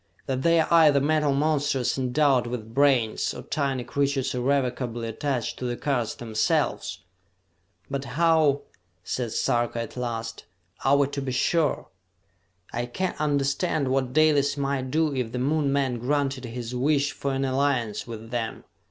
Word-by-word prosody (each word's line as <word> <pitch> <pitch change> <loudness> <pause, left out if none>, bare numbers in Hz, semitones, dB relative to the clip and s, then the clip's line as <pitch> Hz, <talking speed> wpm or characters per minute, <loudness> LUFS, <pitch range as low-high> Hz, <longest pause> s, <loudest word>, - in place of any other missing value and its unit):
That 130 -1 -2
they 170 +2 +4
are 160 - +2
either 155 -4 +6
metal 150 +1 +2
monsters 145 -3 +1
endowed 130 -1 +2
with 115 -2 -6
brains 135 -5 +2
or - - -7
tiny 135 -4 -1
creatures 140 0 -1
irrevocably 125 -2 -1
attached 120 +1 -2
to 125 - -4
the 120 -1 -2
cars 125 -6 -1
themselves!" 110 -2 -1 0.9
"But 140 0 -4
how," 160 -4 +3 0.4
said 120 +4 -3
Sarka 120 +1 0
at 115 - -5
last, 115 -2 -4 0.4
"are 135 +2 +4
we 140 - +4
to 140 - -4
be 135 -1 -3
sure? 150 +3 +1 0.8
I 120 +1 -2
can 185 +9 -2
understand 140 0 0
what 130 -1 0
Dalis 145 -1 +3
might 135 -2 -1
do 155 +1 +1
if 125 -4 -3
the - - -2
Moon 140 +2 +1
men 135 -4 0
granted 135 0 -1
his 120 0 -6
wish 140 +3 +1
for 140 -1 -3
an 135 0 0
alliance 130 -6 0
with 115 0 -8
them. 115 -2 -3
135 Hz, 150 wpm, -26 LUFS, 120-145 Hz, 0.9 s, either